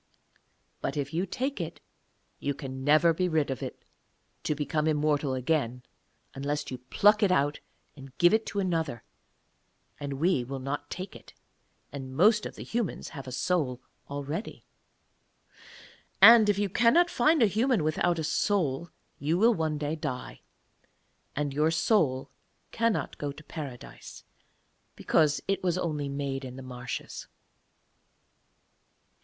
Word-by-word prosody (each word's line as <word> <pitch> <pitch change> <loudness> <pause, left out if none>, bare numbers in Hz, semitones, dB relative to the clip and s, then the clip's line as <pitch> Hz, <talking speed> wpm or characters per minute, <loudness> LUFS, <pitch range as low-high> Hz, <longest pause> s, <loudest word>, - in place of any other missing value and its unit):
But - - -3
if 145 0 -3
you 180 +4 0
take 265 -4 -2
it 165 0 -6 0.6
you 140 0 -2
can 130 -1 -7
never 155 +4 +5
be 180 +2 0
rid 155 -4 +1
of 130 - -4
it - - -7 0.6
to 150 - 0
become 150 +1 -1
immortal 150 -3 +1
again 125 -2 -1 0.5
unless 145 +1 -3
you 130 - -5
pluck 205 - +3
it 200 -3 +4
out 145 -3 +1 0.4
and 135 -2 -13
give 175 +3 +5
it 220 0 +2
to 205 - -2
another; 160 - -1 1.0
and 140 -1 -4
we 145 -1 +1
will 135 +3 -5
not 140 +2 -4
take 185 +1 -6
it, - - -14 0.6
and 130 -2 -7
most 210 +4 +4
of - - -11
the - - -8
humans 230 -6 -3
have 135 -4 -9
a - - -6
soul 135 -3 0 0.3
already. 145 +7 -5 1.5
And 225 -2 +9
if 205 - +3
you 205 0 +1
cannot 245 - +4
find 305 +2 +4
a - - +7
human 220 - +2
without 170 +3 +1
a 160 - -2
soul 170 -3 0 0.3
you 155 +4 +1
will 230 +5 +5
one 160 -5 -1
day 150 +1 -2
die, 145 -5 -5 0.9
and 145 -1 -1
your 150 +3 +2
soul 160 - +1 0.4
cannot 230 -2 -1
go 145 -1 -2
to 150 +2 -12
Paradise, 140 -7 -9 0.7
because 150 -3 +2
it 195 - 0
was 180 -1 0
only 150 -5 -2
made 140 -1 -3
in 130 -1 -7
the 135 - -9
marshes.' 125 -1 -6
155 Hz, 145 wpm, -28 LUFS, 140-185 Hz, 1.5 s, And